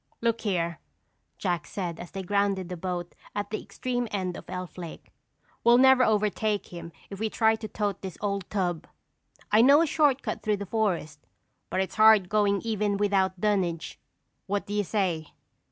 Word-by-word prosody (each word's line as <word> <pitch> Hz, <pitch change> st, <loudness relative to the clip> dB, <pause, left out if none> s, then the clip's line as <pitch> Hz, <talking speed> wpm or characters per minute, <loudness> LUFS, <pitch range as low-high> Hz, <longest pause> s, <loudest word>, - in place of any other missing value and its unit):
"Look 230 Hz, 0 st, 0 dB
here," 170 Hz, -5 st, -1 dB, 0.6 s
Jack 175 Hz, -6 st, -2 dB
said 175 Hz, -4 st, -4 dB
as 175 Hz, -, -8 dB
they 195 Hz, -1 st, -6 dB
grounded 195 Hz, -1 st, 0 dB
the 180 Hz, -, -4 dB
boat 175 Hz, 0 st, -4 dB, 0.2 s
at 205 Hz, 0 st, -3 dB
the 215 Hz, -, -2 dB
extreme 245 Hz, -1 st, -3 dB
end 185 Hz, -4 st, -2 dB
of -, -, -9 dB
Elf 185 Hz, -1 st, -6 dB
Lake. 170 Hz, -2 st, -9 dB, 0.5 s
"We'll 235 Hz, +1 st, +6 dB
never 265 Hz, 0 st, +6 dB
overtake 215 Hz, -1 st, +1 dB
him 170 Hz, -1 st, -8 dB, 0.2 s
if 195 Hz, -, -7 dB
we 220 Hz, 0 st, 0 dB
try 220 Hz, +1 st, +3 dB
to 220 Hz, -, -6 dB
tote 205 Hz, -1 st, -2 dB
this 190 Hz, -2 st, -7 dB
old 200 Hz, -2 st, -2 dB
tub. 180 Hz, -5 st, -2 dB, 0.6 s
I 215 Hz, +2 st, +6 dB
know 280 Hz, +5 st, +7 dB
a 335 Hz, -, +4 dB
shortcut 280 Hz, -7 st, +1 dB
through 210 Hz, -1 st, 0 dB
the 200 Hz, -, -5 dB
forest 180 Hz, -9 st, -1 dB, 0.5 s
but 190 Hz, -, 0 dB
it's 190 Hz, 0 st, -4 dB
hard 215 Hz, -4 st, +6 dB
going 205 Hz, -2 st, +2 dB
even 210 Hz, -3 st, 0 dB
without 195 Hz, -2 st, +1 dB
dunnage. 185 Hz, -5 st, -1 dB, 0.5 s
What 200 Hz, +1 st, -1 dB
do 205 Hz, -, -6 dB
you 205 Hz, 0 st, +1 dB
say?" 180 Hz, -6 st, -2 dB
200 Hz, 175 wpm, -27 LUFS, 180-215 Hz, 0.6 s, know